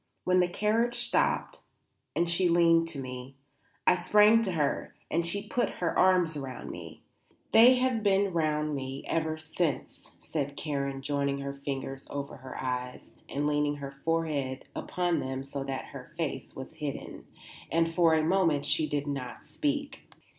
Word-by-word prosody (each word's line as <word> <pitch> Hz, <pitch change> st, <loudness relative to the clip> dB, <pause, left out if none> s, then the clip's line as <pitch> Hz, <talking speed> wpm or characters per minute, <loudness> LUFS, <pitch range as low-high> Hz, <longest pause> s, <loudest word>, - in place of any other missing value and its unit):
When 185 Hz, 0 st, +3 dB
the 180 Hz, -, +4 dB
carriage 220 Hz, +6 st, +1 dB
stopped 240 Hz, 0 st, +1 dB, 0.6 s
and 170 Hz, -, +2 dB
she 175 Hz, +1 st, +2 dB
leaned 165 Hz, -1 st, +4 dB
to 160 Hz, -4 st, -5 dB
me, 130 Hz, 0 st, -7 dB, 0.5 s
I -, -, +7 dB
sprang 210 Hz, +5 st, +5 dB
to 195 Hz, -5 st, -1 dB
her 150 Hz, -4 st, -1 dB, 0.2 s
and 170 Hz, +2 st, +2 dB
she 200 Hz, +5 st, +1 dB
put 240 Hz, +2 st, 0 dB
her 170 Hz, -2 st, -1 dB
arms 180 Hz, -3 st, +4 dB
around 135 Hz, -3 st, -6 dB
me. -, -, -10 dB, 0.5 s
They 245 Hz, +3 st, +8 dB
have 250 Hz, -2 st, +1 dB
been 200 Hz, -2 st, +2 dB
round 155 Hz, -2 st, 0 dB
me 135 Hz, 0 st, -4 dB
ever 160 Hz, -1 st, -1 dB
since," 160 Hz, 0 st, -3 dB
said 145 Hz, -2 st, -4 dB
Karen, 140 Hz, -3 st, -3 dB
joining 140 Hz, -1 st, -1 dB
her 140 Hz, 0 st, -4 dB
fingers 135 Hz, -1 st, -5 dB
over 140 Hz, 0 st, -5 dB
her 130 Hz, 0 st, -9 dB
eyes 125 Hz, -1 st, -4 dB, 0.2 s
and 145 Hz, +1 st, -1 dB
leaning 145 Hz, 0 st, +1 dB
her 140 Hz, -1 st, -6 dB
forehead 140 Hz, -3 st, -2 dB
upon 175 Hz, -1 st, 0 dB
them 130 Hz, 0 st, -3 dB
so 140 Hz, 0 st, -5 dB
that 135 Hz, -1 st, -4 dB
her 140 Hz, +3 st, -10 dB
face 140 Hz, -6 st, -3 dB
was 130 Hz, +3 st, -8 dB
hidden; 150 Hz, -3 st, -6 dB, 0.4 s
and 165 Hz, 0 st, +2 dB
for 165 Hz, -1 st, +4 dB
a 155 Hz, -, +2 dB
moment 165 Hz, -4 st, +2 dB
she 155 Hz, -, +1 dB
did 145 Hz, -1 st, -1 dB
not 135 Hz, -4 st, -5 dB
speak. 290 Hz, -1 st, -3 dB
155 Hz, 160 wpm, -29 LUFS, 140-180 Hz, 0.6 s, They